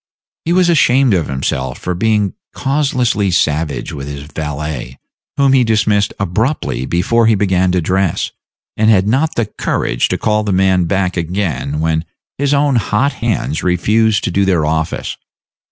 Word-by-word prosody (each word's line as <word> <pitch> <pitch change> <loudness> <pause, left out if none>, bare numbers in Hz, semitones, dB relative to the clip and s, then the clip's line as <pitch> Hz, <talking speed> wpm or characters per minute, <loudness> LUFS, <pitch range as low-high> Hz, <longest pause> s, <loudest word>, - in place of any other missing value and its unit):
He 165 - 0
was 180 -1 +3
ashamed 135 -7 +4
of 85 -5 +1
himself 65 -1 -2
for 90 - -3
being 105 +1 +1 0.2
causelessly 130 -7 0
savage 80 -3 0
with 70 0 -6
his 70 -1 -6
valet, 75 -3 -5 0.4
whom 140 -1 +3
he 130 -2 +5
dismissed 105 -3 +1
abruptly 100 - -1
before 110 +7 +2
he 110 - +4
began 95 -2 +1
to 90 -1 +1
dress, 95 +1 0 0.4
and 110 0 +2
had 100 -3 +4
not 135 +8 +1
the 115 - +1
courage - - -1
to - - -1
call 105 -1 +1
the 105 - -2
man 95 -1 +2
back 95 0 -1
again 80 -5 -2
when 80 0 0 0.4
his 140 0 +1
own 140 -2 +2
hot 115 +6 +1
hands 110 -8 -2
refused 105 +4 +2
to - - -1
do 100 +3 +1
their 90 -5 +2
office. 80 +1 -2
95 Hz, 160 wpm, -16 LUFS, 80-115 Hz, 0.4 s, he